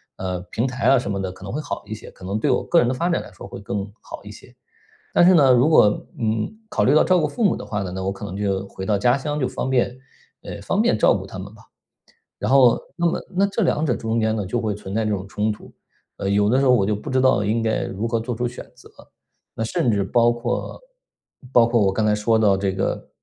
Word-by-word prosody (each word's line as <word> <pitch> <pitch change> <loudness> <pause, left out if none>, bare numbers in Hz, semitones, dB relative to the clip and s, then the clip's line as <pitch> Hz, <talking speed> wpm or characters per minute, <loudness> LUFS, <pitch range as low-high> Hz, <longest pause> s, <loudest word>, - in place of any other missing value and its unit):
呃， 90 -1 -4
平 115 - -1
台 125 -1 -3
啊 135 - +6
什 100 -5 -2
么 100 -1 -2
的 95 -1 -3
可 95 - -14
能 95 - -6
会 150 - -2
好 - - -5
一 110 - -6
些， 110 - -10
可 90 - -13
能 100 +3 -2
对 - - 0
我 - - +1
个 170 - +3
人 120 - +2
的 130 - 0
发 170 +7 -1
展 170 - 0
来 - - -12
说 90 - -11
会 - - -9
更 100 0 -4
好 - - -10
一 - - -10
些。 - - -15 0.6
但 175 - +5
是 185 - +6
呢， 135 -5 +6
如 125 +5 +4
果 155 -9 +6 0.3
嗯， 110 -1 0 0.2
考 - - 0
虑 135 - +4
到 155 - +6
照 185 -1 +3
顾 155 - +1
父 230 +10 -5
母 195 - +3
的 - - -8
话 105 -2 -3
呢， 90 - -4
那 95 0 -4
我 95 - -1
可 100 +1 -9
能 100 -1 -6
就 100 -1 -1
回 95 - -7
到 105 - +2
家 120 +6 +2
乡， 150 +2 -3
就 130 - 0
方 - - -4
便 125 -1 +1 0.5
呃， - - -8
方 - - 0
便 - - +3
照 - - +4
顾 - - -6
他 95 - -9
们 100 +2 -9
吧。 110 - -17 0.8
然 - - -2
后 130 -3 +5 0.2
那 175 0 +1
么 170 - 0 0.2
那 200 +1 +4
这 215 +2 -2
2 160 -3 +1
者 125 -6 0
中 115 0 -1
间 110 0 +1
呢， 100 -3 -3
就 120 +5 -2
会 110 -2 -1
存 100 -1 -8
在 110 0 0
这 105 - -1
种 95 -1 -3
冲 105 +2 -1
突， - - -13 0.5
呃， 100 - -2
有 100 +1 +3
的 130 +4 +3
时 - - +2
候 130 - +5
我 105 -6 +3
就 105 - +1
不 125 - -9
知 130 0 +2
道 130 -6 +3
应 110 +3 0
该 110 -1 0
如 100 +4 -4
何 115 0 0
做 120 +1 -4
出 120 +1 -1
选 125 - -10
择。 - - -16 0.7
那 115 - -4
甚 115 +1 0
至 100 -2 +1
包 120 +4 +3
括 120 - -4 0.7
包 120 -2 +6
括 115 -1 +2
我 95 -1 +2
刚 110 +2 0
才 105 - +3
说 110 +2 +1
到 100 -3 +4
这 95 -1 -1
个， 95 0 -3
110 Hz, 295 characters per minute, -22 LUFS, 100-130 Hz, 0.8 s, 啊